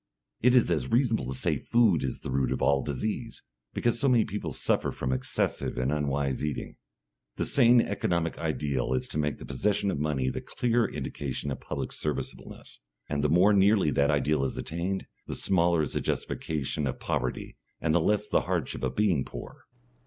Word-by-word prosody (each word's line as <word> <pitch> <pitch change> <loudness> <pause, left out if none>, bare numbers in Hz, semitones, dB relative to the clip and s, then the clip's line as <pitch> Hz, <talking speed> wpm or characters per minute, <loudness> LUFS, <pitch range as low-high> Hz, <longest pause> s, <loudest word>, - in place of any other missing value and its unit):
It 125 +2 +5
is 120 -8 +4
as 75 -6 0
reasonable 115 - +2
to 65 0 -4
say - - 0
food 110 -9 +3
is 65 - -3
the - - -5
root 65 -1 +1
of 65 - -1
all 70 0 +3
disease, 110 - -4 0.3
because 120 0 0
so 135 - +3
many 120 -4 +4
people 95 -5 -4
suffer - - 0
from 65 - -2
excessive 65 -1 -2
and 65 +2 0
unwise 70 -2 -1
eating. 75 -2 -4 0.6
The - - -1
sane 120 -2 +5
economic 85 -6 -1
ideal 70 -6 -1
is 65 - -1
to 75 - -3
make 75 -3 0
the - - -9
possession 100 -1 0
of 70 - -3
money 75 -4 0
the - - -4
clear 120 -1 +1
indication 70 0 -4
of - - -4
public - - -4
serviceableness, 75 -2 -5 0.3
and 70 -1 -1
the 75 - +3
more 90 +6 +5
nearly 100 -4 +4
that 70 0 +2
ideal 75 -1 +2
is 65 - -2
attained, 90 +4 -3 0.2
the - - -4
smaller 85 -3 +2
is 75 - -4
the - - 0
justification 75 -1 -2
of 65 - -4
poverty 60 0 -3 0.2
and 80 -1 +1
the 85 - +4
less 105 +5 +1
the - - +2
hardship - - -2
of - - -2
being 95 -10 +2
poor. - - -10
75 Hz, 190 wpm, -28 LUFS, 70-100 Hz, 0.6 s, It